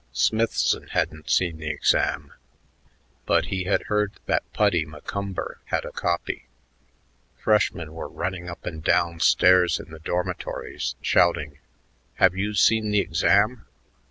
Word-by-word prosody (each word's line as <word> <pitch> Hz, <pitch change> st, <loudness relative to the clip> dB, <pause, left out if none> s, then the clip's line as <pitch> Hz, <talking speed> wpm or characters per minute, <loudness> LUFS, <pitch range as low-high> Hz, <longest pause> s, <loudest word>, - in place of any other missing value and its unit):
Smithson 115 Hz, +1 st, +1 dB
hadn't 75 Hz, -3 st, -2 dB
seen 85 Hz, -3 st, +1 dB
the 80 Hz, -1 st, -4 dB
exam, 75 Hz, -1 st, 0 dB, 0.9 s
but -, -, +3 dB
he 95 Hz, -1 st, -2 dB
had 95 Hz, -, +1 dB
heard 105 Hz, -1 st, 0 dB
that -, -, -1 dB
Puddy 100 Hz, -6 st, +2 dB
McCumber 95 Hz, +6 st, -5 dB
had -, -, -2 dB
a -, -, -6 dB
copy.... 85 Hz, -7 st, -2 dB, 0.9 s
Freshmen 85 Hz, -7 st, +1 dB
were 80 Hz, -, -6 dB
running 90 Hz, -1 st, -4 dB
up 85 Hz, -, -9 dB
and 80 Hz, -3 st, -6 dB
down 85 Hz, 0 st, +1 dB
stairs 90 Hz, +1 st, +4 dB
in -, -, -11 dB
the 80 Hz, -, -10 dB
dormitories, 90 Hz, +3 st, -3 dB
shouting, 75 Hz, -4 st, +2 dB, 0.6 s
"Have 95 Hz, -1 st, +4 dB
you 105 Hz, +2 st, -2 dB
seen 110 Hz, +1 st, +3 dB
the 105 Hz, 0 st, +3 dB
exam?" 100 Hz, +6 st, +2 dB
90 Hz, 130 wpm, -24 LUFS, 80-100 Hz, 0.9 s, stairs